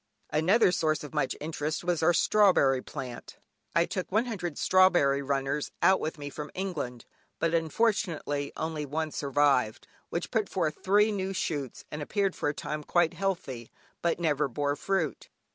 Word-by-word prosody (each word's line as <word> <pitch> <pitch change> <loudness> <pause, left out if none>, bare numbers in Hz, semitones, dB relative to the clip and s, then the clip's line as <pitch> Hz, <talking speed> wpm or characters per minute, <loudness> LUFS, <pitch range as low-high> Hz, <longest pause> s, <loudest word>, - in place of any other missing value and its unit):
Another 180 +7 +4
source 155 -4 0
of 150 - -9
much 150 -4 0
interest 155 +1 -3
was 175 -2 0
our 160 +2 +5
strawberry 170 -8 +4
plant. 130 -4 -8 0.4
I 170 - +4
took 185 +1 -4
100 205 -7 -1
strawberry 175 -7 +4
runners 140 +1 -1
out 190 - +5
with 160 +1 -3
me 145 -1 -6
from 150 +1 -6
England, 155 -11 -4 0.3
but, 165 0 0
unfortunately, 165 -4 0
only 160 -1 -3
one 155 +2 -2
survived, 140 -6 +1 0.2
which 170 - -3
put 220 -4 0
forth 155 -5 -1
three 210 +3 +4
new 195 -1 -2
shoots, 145 -8 -3
and 150 - -5
appeared 195 +5 0
for - - -1
a - - -1
time 150 0 -4
quite 175 +1 +2
healthy, 155 - -3 0.3
but 170 0 0
never 150 -3 +1
bore 145 +3 -1
fruit. 170 -1 -2
155 Hz, 160 wpm, -29 LUFS, 145-185 Hz, 0.4 s, our